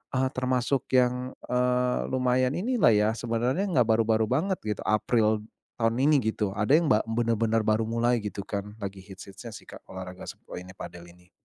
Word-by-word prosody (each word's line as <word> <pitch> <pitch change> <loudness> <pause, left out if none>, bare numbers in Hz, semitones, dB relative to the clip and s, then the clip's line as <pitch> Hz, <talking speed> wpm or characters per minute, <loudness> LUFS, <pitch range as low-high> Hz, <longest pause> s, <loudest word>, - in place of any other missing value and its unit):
eee, 130 0 +2
termasuk 130 0 0
yang, 125 0 +2 0.2
eee, 125 0 +1
lumayan 130 0 +1
inilah 225 - +3
ya, 105 0 +3
sebenarnya 120 - 0
enggak 145 -10 +3
baru-baru 110 0 +3
banget 180 +8 +1
gitu, 105 -1 -3
April 110 +1 +2 0.3
tahun 115 0 0
ini, 145 +1 +4
gitu. 110 -3 -1
Ada 105 +9 +3
yang 170 - -1
ba 120 -8 +4
benar-benar 115 -1 +1
baru 110 +1 +2
mulai, 120 +1 +1
gitu 100 -1 -5
kan, 100 +1 -5
lagi 100 0 -5
hits-hitsnya 100 +4 -11
sih, - - -11
Kak, - - -11
olahraga, 95 -1 -8
suk - - -11 0.2
ini, 90 +1 -11
padel, 85 0 -9
ini. 90 +1 -21
115 Hz, 175 wpm, -27 LUFS, 105-125 Hz, 0.3 s, ini